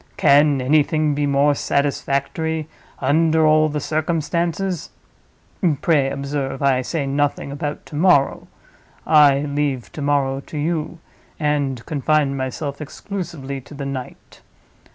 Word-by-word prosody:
Can 145 -1 +4
anything 150 +2 +2
be 145 0 0
more 140 +1 +3
satisfactory, 145 +3 -1 0.3
under 160 +1 +2
all 155 0 +4
the 150 0 -2
circumstances? 170 +4 -1 0.9
Pray 150 -7 +3
observe, 140 -1 -3
I 135 -2 +3
say 145 +3 -2
nothing 140 0 -1
about 145 +1 -5
to - - -10
morrow—I 145 -2 +2
leave 145 -3 -2
to 150 - -7
morrow 140 -2 +1
to 150 - -9
you, 160 +2 -2 0.4
and 145 -5 -1
confine 150 -1 +1
myself 140 +2 -4
exclusively 150 -5 -6
to 130 +4 -13
the 140 0 -5
night. 135 -2 -7
145 Hz, 115 wpm, -21 LUFS, 140-155 Hz, 0.9 s, Can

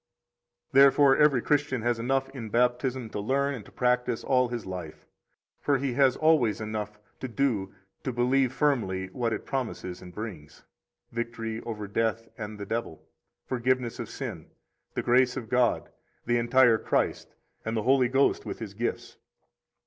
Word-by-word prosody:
41 135 +1 +7
Therefore 140 0 +6
every 150 -5 +4
Christian 145 -5 +1
has 120 -1 +1
enough 135 +3 0
in 125 -5 -7
Baptism 125 +1 0
to - - -4
learn 140 +6 0
and 120 -6 -7
to - - -15
practise 125 -1 0
all 125 -1 +3
his 120 -1 -5
life; 90 -4 -7 0.5
for 140 -1 +2
he 135 -1 -2
has 135 0 +4
always 155 -9 +3
enough 105 -1 -4 0.2
to 130 - -4
do 115 -7 -1 0.3
to 130 - -2
believe 125 +2 +2
firmly 110 -11 0
what 115 +3 -2
it - - -3
promises 115 -9 -4
and 90 -1 -10
brings: 90 -8 -8 0.5
victory 115 -1 -4
over 105 -3 -4
death 115 +2 -1
and 105 -1 -6
the 100 - -5
devil, 110 -7 -4 0.4
forgiveness 125 -1 0
of - - -5
sin, - - -6 0.5
the - - -1
grace 125 +1 +3
of 115 -4 -6
God, 125 -1 +1 0.3
the 120 0 +2
entire 120 -1 +4
Christ, - - -1 0.3
and 110 +1 -2
the 110 - -1
Holy 130 0 +4
Ghost 135 +3 +2
with - - -5
His 110 -4 -7
gifts. 115 +4 -4
120 Hz, 165 wpm, -28 LUFS, 110-130 Hz, 0.5 s, 41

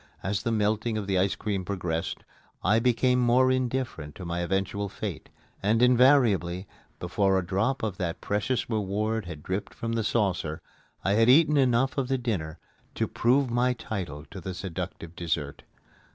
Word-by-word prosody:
As 95 +1 -1
the 115 - -1
melting 110 +1 0
of 105 - -3
the 95 -2 +1
ice 95 +1 +1
cream 100 -3 -2
progressed, 90 -4 -3 0.4
I 105 +6 +4
became 125 +1 +2
more 125 +1 +4
indifferent 125 - -2
to 95 - -8
my 85 0 -2
eventual 95 +3 -1
fate; 95 -5 -6 0.3
and, 105 +3 +2
invariably, 120 -8 +4 0.3
before 95 +2 +1
a 95 - -1
drop 110 +9 0
of 105 -4 -2
that 85 -2 -3
precious 105 +4 -1
reward 110 0 -1
had 80 -4 -8
dripped 95 +2 -4
from 115 0 -3
the 115 -1 0
saucer, 95 -8 0 0.4
I 95 - +2
had 115 +3 +4
eaten 150 +3 +6
enough 130 0 +2
of 130 - -1
the 135 0 +1
dinner 90 -11 -3 0.4
to - - 0
prove 130 +2 +2
my 125 +1 +2
title 90 - -5
to 95 - -8
the 95 +2 -5
seductive 85 -2 -6
dessert. 80 -5 -3
105 Hz, 165 wpm, -27 LUFS, 90-120 Hz, 0.4 s, eaten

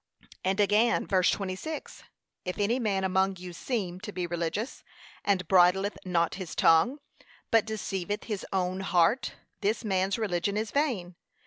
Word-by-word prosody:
And 190 +2 0
again, 210 +3 +3
verse 185 -2 +3
26, 195 +11 -4 0.4
'If 180 - -4
any 220 +5 +1
man 200 -5 0
among 190 +1 +2
you 180 0 -8
seem 185 -3 -3
to 210 +2 -7
be 180 -3 -3
religious, 175 +7 -3 0.4
and 185 -4 +1
bridleth 190 +2 +4
not 170 -2 +1
his 175 - -6
tongue, 165 - +4 0.5
but 225 -2 +5
deceiveth 205 -2 -3
his 210 -4 -4
own 185 -1 0
heart, 185 +5 +2 0.3
this 215 +3 0
man's 190 -1 +1
religion 200 -2 -1
is 215 0 -2
vain.' 240 - 0
195 Hz, 145 wpm, -29 LUFS, 180-215 Hz, 0.5 s, but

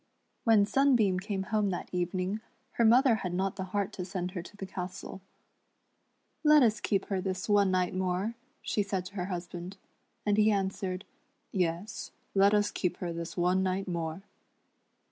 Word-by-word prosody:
When 220 -3 +6
Sunbeam 220 -5 +3
came 195 0 -3
home 210 -2 +3
that 180 - -3
evening 185 +3 -1 0.3
her 235 - +1
mother 240 +1 +6
had 180 -4 -3
not 190 +1 0
the 190 -1 -4
heart 200 +1 -2
to 185 - -4
send 180 -1 -3
her 180 -2 -4
to 205 +4 -13
the 195 - -5
castle. 185 0 -6 1.2
"Let 300 -2 +7
us 220 -2 +3
keep 195 -3 0
her 195 -2 0
this 185 -1 -3
one 205 -2 +4
night 185 -1 +1
more," 185 +4 -1 0.3
she 210 - 0
said 195 -2 -2
to 190 - -9
her 180 -3 -2
husband; 180 0 -6 0.5
and 205 0 +2
he 215 0 +5
answered, 190 -2 -1 0.3
" - - -46
Yes, 180 +3 -2 0.2
let 200 +1 +5
us 205 0 +2
keep 180 - -1
her 175 -2 -3
this 170 +2 -6
one 180 +2 +3
night 190 +1 -1
more." 170 0 -3
190 Hz, 175 wpm, -30 LUFS, 180-205 Hz, 1.2 s, Let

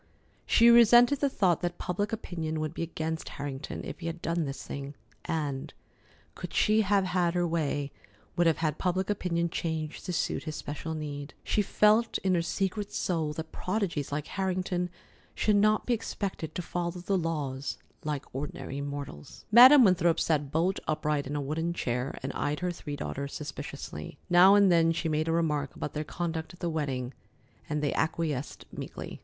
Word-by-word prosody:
She 235 0 +6
resented 240 +3 +7
the 280 - +2
thought 185 - +2
that 175 0 -2
public 205 +3 -2
opinion 165 -8 -3
would 155 0 -2
be - - -5
against 160 -1 -3
Harrington 140 0 -5
if - - -7
he 170 - -5
had 165 +1 -4
done 165 -1 -1
this 135 -1 -5
thing, 140 +1 -6 0.3
and, 145 -4 -2 0.6
could - - -7
she 215 +1 +4
have 200 -1 +3
had 180 -1 +1
her 175 0 +2
way, 145 -4 -1 0.4
would 175 -1 +3
have 165 - +3
had 155 -1 -1
public 185 +2 0
opinion 170 -4 0
changed 160 -3 -3
to - - -1
suit 175 - -1
his 155 - -4
special 160 +2 -5
need. 145 -2 -6
She 210 - +1
felt 215 +3 +3
in 190 -1 +2
her 175 - +3
secret 195 +4 -2
soul 160 -4 -1
that 160 +1 -6
prodigies 185 -8 -2
like 145 +1 -2
Harrington 185 -2 -1 0.5
should 210 -1 +3
not 215 +1 +3
be 245 - +2
expected 195 -8 -4
to 180 - -3
follow 175 +1 -2
the 180 +3 -2
laws 150 -6 -2 0.3
like 150 -2 -3
ordinary 140 0 -5
mortals. 140 - -7
Madam 255 +4 +10
Winthrop 175 -5 +4
sat 150 -4 0
bolt 175 +5 +1
upright 150 -2 0
in 145 - -4
a 145 - -1
wooden 160 +4 -2
chair, 125 -4 -2
and 135 - -3
eyed 150 +3 -2
her 180 0 0
three 150 -4 -6
daughters 140 0 -5
suspiciously. 140 - -7
Now 185 +3 +8
and 200 -2 +6
then 165 -1 +4
she 165 - -2
made 155 +1 0
a - - +1
remark 150 -4 0
about - - -5
their 150 - -2
conduct 165 +1 -4
at - - -25
the 170 -2 -1
wedding, 135 -5 -2 0.6
and 150 0 -1
they 145 - +1
acquiesced 155 -3 -2
meekly. - - -7
165 Hz, 180 wpm, -29 LUFS, 150-185 Hz, 0.6 s, Madam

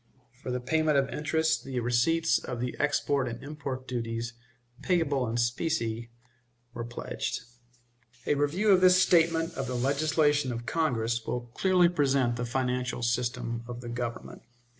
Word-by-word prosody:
For - - -6
the 125 0 -1
payment 155 +3 +1
of 135 -1 +2
interest 160 +1 0
the 130 -2 -3
receipts 120 +8 +2
of 125 -2 -6
the 125 0 -3
export 145 -2 +1
and 115 -1 -6
import 140 -3 -6
duties, 115 -1 -3 0.5
payable 145 -8 +1
in 115 +1 -2
specie, 120 -2 -1 0.6
were 120 - -4
pledged. 120 +1 -4 0.8
A - - +2
review 145 +9 +1
of 185 -1 +5
this 185 0 +6
statement 165 -2 +3
of 135 - -4
the 125 - -3
legislation 145 +1 +2
of 120 0 -5
Congress 120 -7 0
will 120 -1 -4
clearly 185 -2 +4
present 140 -7 +2
the 120 +1 -3
financial 125 0 -1
system 120 -1 -1
of 120 0 -7
the 120 - -7
Government. 120 -1 -5
130 Hz, 150 wpm, -28 LUFS, 120-155 Hz, 0.8 s, this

